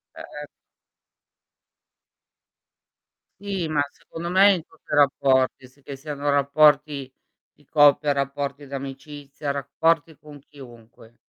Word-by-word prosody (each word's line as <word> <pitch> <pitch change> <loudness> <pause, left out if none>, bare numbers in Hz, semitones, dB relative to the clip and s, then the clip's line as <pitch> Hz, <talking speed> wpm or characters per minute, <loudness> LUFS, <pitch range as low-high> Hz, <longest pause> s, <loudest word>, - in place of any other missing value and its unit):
Eh. - - -9 3.0
Sì, 195 -5 -3
ma 150 -2 0
secondo 170 +1 -9
me 195 +2 +6
in 170 -3 -5
tutti 160 - -20
i - - +3
rapporti, 130 -2 +2
s 140 +2 -26
che 140 - -8
siano 145 +1 -5
rapporti 145 -1 +2 0.4
di 145 - -28
coppia, 145 0 +4
rapporti 140 0 -4
d'amicizia, 140 +1 -7
rapporti 155 +3 0
con 150 -1 -14
chiunque. 120 -5 -16
145 Hz, 105 wpm, -23 LUFS, 135-150 Hz, 3.0 s, me